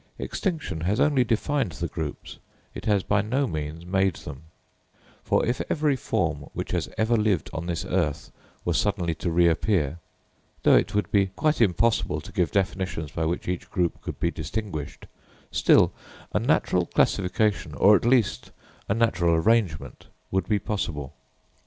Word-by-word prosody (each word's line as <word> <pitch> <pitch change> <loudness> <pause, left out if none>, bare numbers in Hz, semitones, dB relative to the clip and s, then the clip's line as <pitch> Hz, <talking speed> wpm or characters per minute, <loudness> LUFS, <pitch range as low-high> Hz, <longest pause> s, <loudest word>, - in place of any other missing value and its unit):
Extinction 160 - -3
has 95 +6 0
only 145 -4 +4
defined 115 - 0
the 70 - -3
groups: - - -6 0.3
it - - -8
has 100 -3 +2
by 100 +2 +2
no 125 +7 0
means 80 - -5
made 95 -1 +1
them; 70 +3 -9 0.8
for - - +2
if 120 0 -1
every 150 -3 +2
form 80 - -2
which - - -4
has - - -1
ever 110 +2 +2
lived 105 -3 +1
on 80 +1 -4
this 85 +1 -2
earth 75 -6 -1 0.3
were 85 - +1
suddenly 95 -3 0
to 85 - -3
reappear, 85 -1 +2 0.6
though - - +6
it 100 - +2
would 105 - 0
be 100 -1 +3
quite 155 0 +1
impossible 115 +2 +2
to - - -11
give 90 -4 +1
definitions 95 -4 -2
by 80 +1 -2
which 85 +2 -2
each 90 -1 -3
group 90 -2 -1
could - - -6
be 85 - +1
distinguished, 80 -2 -5 0.5
still - - +4 0.4
a - - +2
natural - - +1
classification, 95 -4 +1
or 100 +11 +6
at - - +1
least 120 -3 +2 0.4
a 100 - +2
natural 95 -8 +2
arrangement, 95 -2 0 0.2
would 95 +3 -1
be 105 - +3
possible. 80 -9 -3
95 Hz, 160 wpm, -25 LUFS, 80-110 Hz, 0.8 s, though